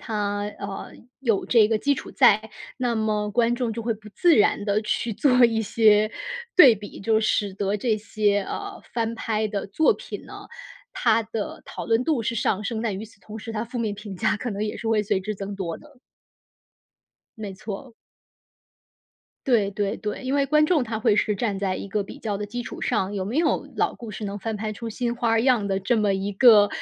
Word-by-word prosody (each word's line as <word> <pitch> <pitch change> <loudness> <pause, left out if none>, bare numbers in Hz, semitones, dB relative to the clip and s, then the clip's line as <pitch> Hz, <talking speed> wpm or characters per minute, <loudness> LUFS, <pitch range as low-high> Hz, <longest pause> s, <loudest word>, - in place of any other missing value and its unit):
它， 205 -2 -2 0.2
呃， 200 -1 -6 0.3
有 230 -7 +1
这 225 -3 +5
个 220 -1 +1
基 285 +5 +2
础 - - -8
在， 220 -4 +4 0.3
那 245 -2 0
么 210 -1 0
观 235 +2 +2
众 240 -2 -2
就 230 - -4
会 230 0 -1
不 215 0 -14
自 335 - +3
然 205 -1 +3
地 210 +1 +1
去 225 +2 -1
做 250 +2 +4
一 225 -1 +2
些 215 0 +4 0.5
对 265 -10 +9
比。 205 0 -10
就 220 +2 +2
使 205 -2 0
得 200 +1 -1
这 220 +1 0
些， 210 -1 +1
呃， 400 - -6
翻 230 -1 -1
拍 220 -1 -1
的 205 -2 -3
作 310 +10 +3
品 - - -8
呢， - - -11 0.4
它 230 - +2
的 220 -1 -5
讨 - - -7
论 230 +2 +2
度 295 -3 +1
是 230 +1 -2
上 210 -2 0
升， 220 +1 -2
但 210 -5 -2
与 215 - -6
此 210 -2 -18
同 215 +1 -9
时， 225 +1 -7
它 215 +1 -2
负 240 +1 -6
面 215 -3 -1
评 205 -2 -8
价 - - +1
可 240 +3 -4
能 205 +1 -2
也 210 - -4
是 225 - -4
会 220 -1 +3
随 205 -2 0
之 210 +2 -4
增 200 +1 -5
多 175 -4 -4
的。 290 -4 -19 1.4
没 205 -3 -6
错。 215 +6 -7 1.5
对 225 -6 +3
对 205 +1 -2
对， 210 +4 -5
因 260 +2 -1
为 280 -1 +3
观 305 +2 +3
众 310 -7 +2
他 220 -1 -3
会 215 -2 +3
是 210 - +2
站 200 -1 -2
在 195 -2 -1
一 200 - -6
个 205 +1 -1
比 - - -10
较 210 -3 -3
的 210 - -4
基 240 +4 -5
础 - - -8
上， 205 -4 0
有 190 -2 -2
没 230 +10 -2
有 330 - +1
老 - - +1
故 230 -2 -9
事 210 +1 -6
能 200 0 -4
翻 225 +2 -3
拍 215 +1 -3
出 230 +2 -6
新 240 +1 -2
花 230 -1 +1
样 240 -4 +3
的 195 0 -1
这 210 +5 +1
么 210 -2 +2
一 195 +1 -2
个 210 -1 +7
215 Hz, 235 characters per minute, -24 LUFS, 205-235 Hz, 1.5 s, 对